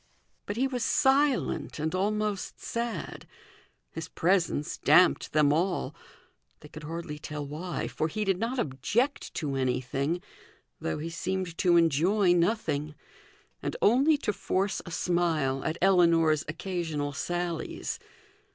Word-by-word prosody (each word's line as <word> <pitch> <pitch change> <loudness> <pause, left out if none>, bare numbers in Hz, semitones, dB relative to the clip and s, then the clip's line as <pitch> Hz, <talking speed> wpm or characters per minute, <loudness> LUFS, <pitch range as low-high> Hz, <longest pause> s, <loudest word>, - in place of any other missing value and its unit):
But 205 - -3
he 260 - +2
was 250 -3 -2
silent, 270 0 +2
and 155 +2 -2
almost 205 +1 -1
sad: 235 0 -4 0.6
his 165 0 -6
presence 175 -4 0
damped 175 +5 +4
them 150 -2 +4
all; 175 +3 0 0.7
they - - -12
could 155 0 -10
hardly 165 -1 -5
tell 150 -1 -5
why, 160 +5 -4
for 155 - -1
he 210 +6 -3
did 195 -2 +1
not 235 +4 -2
object 240 - -1
to 145 -4 -2
anything, 135 +5 -1 0.6
though 80 - -2
he 165 +2 -5
seemed 185 0 -3
to 175 -1 +4
enjoy 175 +4 +3
nothing, 165 -5 0 0.7
and - - -3
only 300 - +4
to 210 -6 -1
force 195 +1 -1
a - - -5
smile 165 -6 0
at 160 +1 -2
Ellinor's 165 -5 +4
occasional 160 -4 -3
sallies. 175 +2 -3
175 Hz, 130 wpm, -28 LUFS, 155-200 Hz, 0.7 s, damped